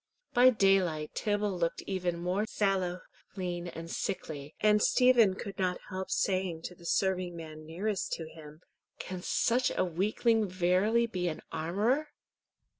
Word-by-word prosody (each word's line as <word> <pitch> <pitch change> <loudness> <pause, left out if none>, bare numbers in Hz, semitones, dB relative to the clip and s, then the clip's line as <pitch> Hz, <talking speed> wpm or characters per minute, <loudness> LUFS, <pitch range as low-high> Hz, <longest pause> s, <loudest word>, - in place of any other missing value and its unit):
By 250 +1 +7
daylight 195 -8 +2
Tibble 205 -2 0
looked 170 -1 -1
even 180 -3 -2
more 180 +5 -1
sallow, 190 -4 0 0.3
lean, 175 -2 -3
and 165 -1 -7
sickly, 155 -6 -4
and 210 0 +4
Stephen 240 -7 +5
could 200 0 -7
not 180 -1 +1
help 185 0 -4
saying 185 -4 0
to - - -6
the 170 -1 -11
serving 185 -2 0
man 155 -2 -9
nearest 190 +5 -2
to 160 - -4
him, 155 0 -13 0.4
"Can 185 -1 -6
such 245 +6 +2
a - - +3
weakling 210 +5 +1
verily 185 +6 +2
be 185 -6 -2
an 155 - -4
armourer?" 205 - 0
185 Hz, 145 wpm, -31 LUFS, 170-205 Hz, 0.4 s, By